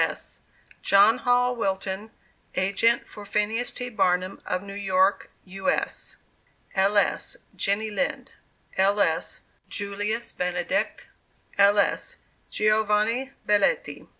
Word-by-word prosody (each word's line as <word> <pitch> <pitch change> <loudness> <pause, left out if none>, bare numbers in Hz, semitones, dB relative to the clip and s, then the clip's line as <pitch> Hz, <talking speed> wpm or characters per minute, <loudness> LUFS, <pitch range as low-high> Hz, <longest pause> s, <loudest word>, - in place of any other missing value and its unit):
S.] - - -5 0.4
JOHN 205 +5 +5
HALL 245 0 +2
WILTON, 195 -1 -2 0.5
Agent 200 +5 +2
for 210 - -10
PHINEAS 210 +4 0
T. 250 0 -5
BARNUM, 185 -3 0
of 185 +1 -1
New 200 0 -8
York, 195 -1 +1 0.2
U. 190 +1 -3
S. - - -2 0.6
[L. 195 +2 +2
S.] 205 - +1 0.2
JENNY 210 +2 +1
LIND. 275 +7 -2 0.5
[L. 200 +2 +3
S.] 200 - 0 0.3
JULIUS 205 +3 -2
BENEDICT. 180 -1 -2 0.5
[L. 200 +1 +6
S.] 200 - 0 0.3
GIOVANNI 215 +4 +1
BELLETTI. 480 - +1
205 Hz, 110 wpm, -25 LUFS, 195-225 Hz, 0.6 s, L